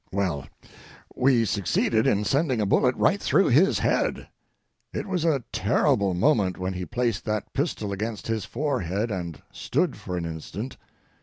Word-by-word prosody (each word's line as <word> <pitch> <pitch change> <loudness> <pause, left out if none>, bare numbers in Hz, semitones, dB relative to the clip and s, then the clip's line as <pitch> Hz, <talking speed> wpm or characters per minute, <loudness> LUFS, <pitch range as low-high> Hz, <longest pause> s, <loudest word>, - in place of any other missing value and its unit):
Well, 90 -8 -1 0.7
we 125 -3 +3
succeeded 105 +2 +1
in 105 +1 +2
sending 135 0 +1
a 105 - +1
bullet 125 +5 +3
right 200 +1 +2
through 195 - +3
his 155 +11 +4
head. - - 0 0.6
It - - -4
was 185 -5 -1
a 145 -6 +2
terrible 100 -3 +2
moment 100 -4 +2
when 95 +1 -3
he 90 0 -4
placed 120 +1 -1
that 110 0 -3
pistol 135 - -2
against 105 +2 -4
his 110 -2 -1
forehead 115 - -2
and 85 -6 -4
stood - - -1
for 90 - -5
an 85 - -3
instant. 85 - -6
110 Hz, 155 wpm, -25 LUFS, 95-130 Hz, 0.7 s, his